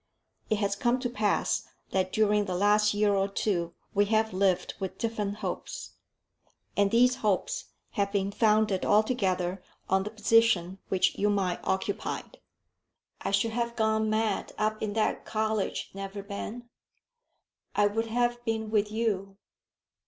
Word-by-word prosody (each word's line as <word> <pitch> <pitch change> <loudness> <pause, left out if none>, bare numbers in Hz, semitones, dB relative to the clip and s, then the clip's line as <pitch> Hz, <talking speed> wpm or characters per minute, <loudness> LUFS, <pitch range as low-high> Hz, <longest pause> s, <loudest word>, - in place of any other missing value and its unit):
It 215 - +3
has 200 -1 0
come 240 +4 +1
to 245 -2 -2
pass 210 -3 0 0.2
that 185 -1 0
during 210 -1 +3
the 185 -2 -2
last 210 +2 +4
year 205 0 +3
or 195 0 +2
two 175 -4 -1 0.2
we 205 0 +4
have 220 0 +1
lived 185 -1 +1
with 190 -2 -4
different 210 -3 -2
hopes. - - -5 0.8
And 200 -1 +3
these 250 +3 +4
hopes 220 - 0 0.3
have 200 -2 0
been 200 -1 0
founded 215 -2 +2
altogether 195 -4 +1 0.3
on 190 0 +4
the 205 - -4
position 215 -4 +3
which 185 - +2
you 205 - +3
might 195 -3 0
occupy." 190 +1 -2 1.0
"I - - -2
should 230 - +1
have 235 +1 -2
gone 220 -1 +1
mad 215 -1 0
up 215 0 0
in 210 -1 -2
that 215 0 0
college, 215 -2 -1
Neverbend." 200 +4 -6 1.1
"I 205 - +4
would 225 +3 0
have 240 +1 0
been 220 -2 -2
with 210 -1 +2
you." 200 -3 -1
210 Hz, 145 wpm, -28 LUFS, 195-220 Hz, 1.1 s, last